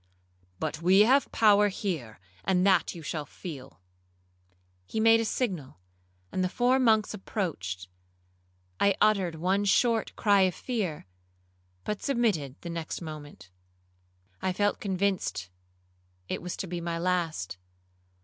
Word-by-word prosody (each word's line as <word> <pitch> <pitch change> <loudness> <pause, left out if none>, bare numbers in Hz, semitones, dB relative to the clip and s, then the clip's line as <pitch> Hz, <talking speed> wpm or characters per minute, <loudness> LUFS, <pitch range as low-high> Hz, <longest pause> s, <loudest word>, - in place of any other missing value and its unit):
'But 155 - -3
we 185 +4 +6
have 265 +6 +4
power 210 -2 +5
here, 165 - -4 0.2
and 185 -1 +2
that 195 -1 +3
you 165 - -9
shall 155 0 -3
feel.' 140 - -9 1.1
He - - -3
made 225 +1 +6
a 225 - 0
signal, 185 - -2 0.5
and 185 - 0
the 185 - 0
four 250 +5 +2
monks 220 -4 +3
approached. 120 - -4 0.9
I 200 -1 +4
uttered 195 -6 +3
one 185 +5 +1
short 225 +2 +2
cry 205 -2 +4
of 185 -2 +2
fear, 205 - -3 0.8
but 210 -1 -3
submitted 210 - 0
the 170 - -6
next 165 -1 -4
moment. 145 - -9 0.9
I 185 - 0
felt 205 +2 +1
convinced 190 - -1 0.8
it - - -3
was 180 0 -5
to - - -3
be 175 0 -4
my 170 0 -2
last. 165 - -1
185 Hz, 130 wpm, -28 LUFS, 160-210 Hz, 1.1 s, we